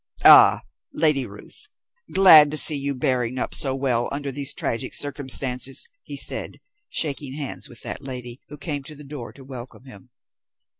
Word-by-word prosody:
"Ah, -, -, +7 dB, 0.3 s
Lady 150 Hz, -5 st, +1 dB
Ruth! 105 Hz, -, -11 dB, 0.4 s
Glad 160 Hz, -6 st, +7 dB
to 155 Hz, -, -2 dB
see 155 Hz, -, +5 dB
you 140 Hz, 0 st, -3 dB
bearing 125 Hz, -1 st, -1 dB
up -, -, -3 dB
so 135 Hz, -2 st, +3 dB
well 125 Hz, -3 st, -1 dB
under 140 Hz, 0 st, -4 dB
these 140 Hz, 0 st, -3 dB
tragic 125 Hz, +3 st, -3 dB
circumstances," 135 Hz, -2 st, 0 dB
he -, -, -9 dB
said, -, -, -3 dB, 0.3 s
shaking 140 Hz, -3 st, -3 dB
hands 145 Hz, -3 st, -6 dB
with 120 Hz, -, -11 dB
that -, -, -6 dB
lady, 125 Hz, -2 st, -6 dB
who 150 Hz, -, -10 dB
came 145 Hz, -1 st, -5 dB
to 150 Hz, +3 st, -9 dB
the 150 Hz, -, -12 dB
door 140 Hz, -4 st, -9 dB
to 135 Hz, -, -14 dB
welcome 130 Hz, -2 st, -11 dB
him. 105 Hz, -7 st, -13 dB
135 Hz, 165 wpm, -22 LUFS, 125-145 Hz, 0.4 s, Ah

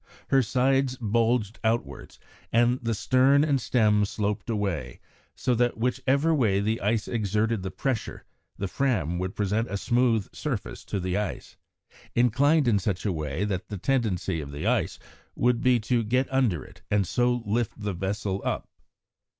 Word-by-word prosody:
Her 135 Hz, -1 st, +5 dB
sides 130 Hz, +2 st, +1 dB
bulged 115 Hz, -1 st, +1 dB
outwards 110 Hz, -, -2 dB, 0.3 s
and 120 Hz, +2 st, +3 dB
the 115 Hz, -1 st, -1 dB
stern 130 Hz, +6 st, +4 dB
and 140 Hz, -4 st, +1 dB
stem 105 Hz, -4 st, +3 dB
sloped 105 Hz, +2 st, -2 dB
away, 95 Hz, -, -2 dB, 0.4 s
so 125 Hz, -, 0 dB
that 120 Hz, 0 st, +1 dB
whichever 130 Hz, +6 st, +1 dB
way 110 Hz, -10 st, +2 dB
the 110 Hz, +3 st, -1 dB
ice 105 Hz, +2 st, 0 dB
exerted 110 Hz, 0 st, 0 dB
the 95 Hz, -, -4 dB
pressure, 130 Hz, +2 st, -3 dB, 0.3 s
the 100 Hz, -, -2 dB
Fram 90 Hz, -, 0 dB
would 95 Hz, +1 st, -3 dB
present 105 Hz, +3 st, 0 dB
a 100 Hz, -, -2 dB
smooth 120 Hz, -2 st, +1 dB
surface -, -, -4 dB
to 100 Hz, -, -3 dB
the 90 Hz, +1 st, -1 dB
ice, 105 Hz, -1 st, -4 dB, 0.6 s
inclined 135 Hz, +5 st, +3 dB
in 105 Hz, -4 st, +3 dB
such 95 Hz, 0 st, -2 dB
a 100 Hz, -, +1 dB
way 75 Hz, +4 st, -2 dB
that 95 Hz, -2 st, -3 dB
the 105 Hz, -, -5 dB
tendency 95 Hz, -, 0 dB
of 70 Hz, -1 st, -8 dB
the 70 Hz, +1 st, -5 dB
ice -, -, +1 dB, 0.4 s
would 120 Hz, 0 st, +2 dB
be 125 Hz, -1 st, +4 dB
to 120 Hz, +2 st, +1 dB
get 125 Hz, +5 st, +1 dB
under 115 Hz, -, +1 dB
it -, -, -16 dB
and 105 Hz, -2 st, +2 dB
so 120 Hz, +4 st, +1 dB
lift 110 Hz, +2 st, -1 dB
the 105 Hz, -2 st, -2 dB
vessel 95 Hz, +2 st, -2 dB
up. -, -, -2 dB
110 Hz, 165 wpm, -26 LUFS, 100-125 Hz, 0.6 s, Her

